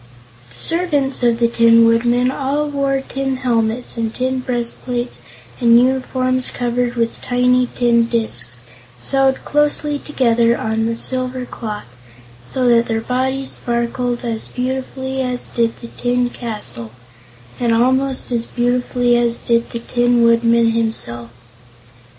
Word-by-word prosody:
The 115 - -16
servants 290 - +2
of 235 -1 +3
the 235 - +4
Tin 230 0 +5
Woodman 240 +2 +2
all 285 +2 -1
wore 275 -2 -1
tin 270 -1 -2
helmets 235 -1 -1
and 225 -1 -1
tin 260 +2 -2
breastplates 245 0 -3 0.4
and 235 -1 +6
uniforms 255 0 +1
covered 245 0 -2
with 230 -1 -2
tiny 250 0 +2
tin 235 -1 +3
discs 125 - -1 0.4
sewed 270 - +1
closely 295 0 +1
together 235 -5 +2
on 225 +1 -1
silver 255 +1 -1
cloth, 215 -4 -6 0.6
so 255 -1 0
that 235 0 +4
their 225 -1 -1
bodies 265 +3 -1
sparkled 240 +1 -2
as 225 -2 -3
beautifully 265 +1 -3
as 250 -1 -2
did 230 -1 -1
the 235 - -7
tin 245 0 -1
castle 120 - -4 0.7
and 240 -1 +1
almost 260 +3 +1
as 235 -1 -1
beautifully 245 0 +1
as 235 -1 +2
did 235 0 0
the - - -5
Tin 240 0 +1
Woodman 230 0 +4
himself. 220 - -3
245 Hz, 130 wpm, -18 LUFS, 230-255 Hz, 0.7 s, and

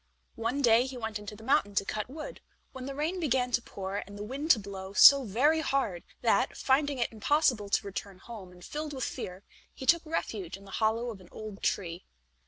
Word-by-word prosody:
One 235 +5 -1
day 235 +1 +5
he 260 -1 -7
went 225 -3 -4
into 210 0 -8
the 220 - -13
mountain 205 -5 +2
to 195 - +2
cut 215 +3 -3
wood, 320 - -8 0.3
when 260 0 -7
the 275 - -5
rain 320 +6 -1
began 255 -6 +1
to 240 - +2
pour 195 -3 -5
and 205 0 -7
the 205 - -5
wind 275 +8 -5
to 245 - +7
blow 195 -1 -7
so 275 +5 +9
very 275 +10 +3
hard 270 - 0 0.2
that, - - +2
finding 280 +1 +2
it 235 - 0
impossible 230 -2 +1
to 200 - +1
return 200 -1 -6
home, 195 -2 -10
and 180 0 -14
filled 300 0 -5
with 260 -2 -4
fear, 185 +2 -5 0.3
he 265 - -8
took 340 +4 +5
refuge 215 - -3
in 200 - -16
the 195 - -12
hollow 225 +3 0
of 195 -4 -10
an 180 - -16
old 215 -2 -8
tree. 175 -2 -2
230 Hz, 215 wpm, -30 LUFS, 200-275 Hz, 0.3 s, so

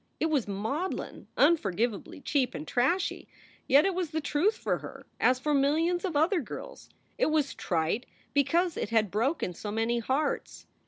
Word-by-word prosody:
It 320 - +1
was 275 -8 +1
maudlin, 225 - -3
unforgivably 235 - +1
cheap 265 -3 0
and 150 - -6
trashy, 275 +10 0 0.4
yet 285 +2 +6
it 390 - +2
was 355 -2 -2
the 315 0 -2
truth 320 +8 +1
for - - -1
her, - - -10
as 255 0 +4
for 295 +3 -1
millions 320 +6 +2
of 360 -5 -2
other 335 +4 +3
girls. - - -9 0.3
It - - +3
was 310 -2 +1
trite 170 +7 -1 0.3
because 320 +5 +2
it - - -2
had 220 -4 +2
broken 225 - 0
so 205 +5 -6
many 225 +2 0
hearts. 270 +5 -2
285 Hz, 165 wpm, -29 LUFS, 230-330 Hz, 0.4 s, yet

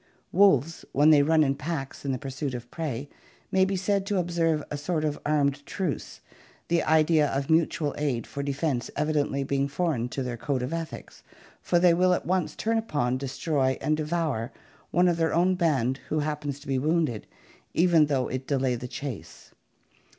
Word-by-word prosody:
Wolves, 165 -5 +3
when 145 +3 +5
they 150 -2 +7
run 155 +2 +4
in 135 -2 +2
packs 140 -1 -5
in 140 - -1
the 130 - -1
pursuit 135 0 -4
of 120 0 -8
prey, 145 -5 -4 0.4
may 190 0 +4
be 195 0 -1
said 195 +1 0
to 205 - 0
observe 165 -3 +1
a - - -2
sort 155 +2 -1
of 150 -1 -2
armed 145 -1 +1
truce, 175 0 -4 0.5
the 170 0 +3
idea 155 -1 +3
of 135 +3 -1
mutual 160 -2 +2
aid 135 -6 -1
for 140 - -5
defense 140 -2 -1
evidently 145 -2 0
being 140 0 0
foreign 140 -5 -1
to 135 - -3
their 125 -2 -4
code 130 +1 -2
of 130 - -3
ethics, 165 -1 -6 0.4
for 175 - +1
they 175 0 +5
will 180 +1 +3
at - - -5
once 185 -2 0
turn 225 +1 0
upon, 130 - -1
destroy, 135 0 0
and 155 - +1
devour 155 -7 -1 0.4
one 180 +1 +3
of 175 -2 +2
their 165 -1 +1
own 180 +2 +3
band 140 -8 +1
who 155 0 0
happens 145 -2 -3
to 145 - -14
be 135 -1 0
wounded, 155 -6 0 0.5
even 170 -3 +5
though 135 -4 0
it 130 +1 -5
delay 135 -3 +1
the 125 +1 -5
chase. 115 - -8
150 Hz, 185 wpm, -27 LUFS, 135-165 Hz, 0.5 s, they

